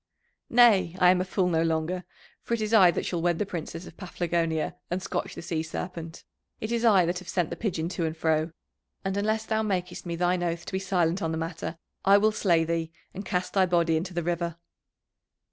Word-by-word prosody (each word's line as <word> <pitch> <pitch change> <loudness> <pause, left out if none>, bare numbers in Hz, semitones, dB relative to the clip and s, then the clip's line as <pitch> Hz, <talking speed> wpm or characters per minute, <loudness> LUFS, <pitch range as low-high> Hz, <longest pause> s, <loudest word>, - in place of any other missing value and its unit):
"Nay, 205 -8 +5
I 180 -1 +6
am 180 0 +2
a - - +1
fool 185 0 0
no 165 -2 +2
longer, 165 +2 -1 0.4
for 235 - -1
it 225 - -5
is 215 +1 -2
I 190 -5 +8
that 170 - -1
shall 175 -2 -2
wed 175 -1 +1
the 210 - 0
Princess 170 -1 -6
of 165 - -13
Paphlagonia 170 -4 -1
and 180 - -1
scotch 190 - -4
the - - -7
Sea 165 -2 -2
Serpent, 165 0 -6 0.4
it 220 - -4
is 235 0 0
I 200 -6 +6
that 175 +1 -1
have 185 -2 -11
sent 175 -2 0
the - - -2
pigeon 170 -7 -2
to 175 -3 -1
and 160 +1 -5
fro, 160 0 +1 0.5
and 195 0 -1
unless 215 +2 0
thou 220 -1 0
makest 185 -4 -2
me 170 - -2
thine 175 +1 +1
oath 170 0 -2
to - - -8
be 190 - 0
silent 180 -1 +1
on 160 - -1
the 160 - -2
matter 165 0 -4 0.3
I 200 +1 +7
will 215 +2 +3
slay 175 -6 +2
thee 165 0 -2 0.2
and 195 - -6
cast 180 -1 -2
thy 190 -2 +4
body 170 -2 +2
into 175 +3 -3
the 175 - -1
river." 170 0 -1
175 Hz, 225 wpm, -27 LUFS, 165-190 Hz, 0.5 s, I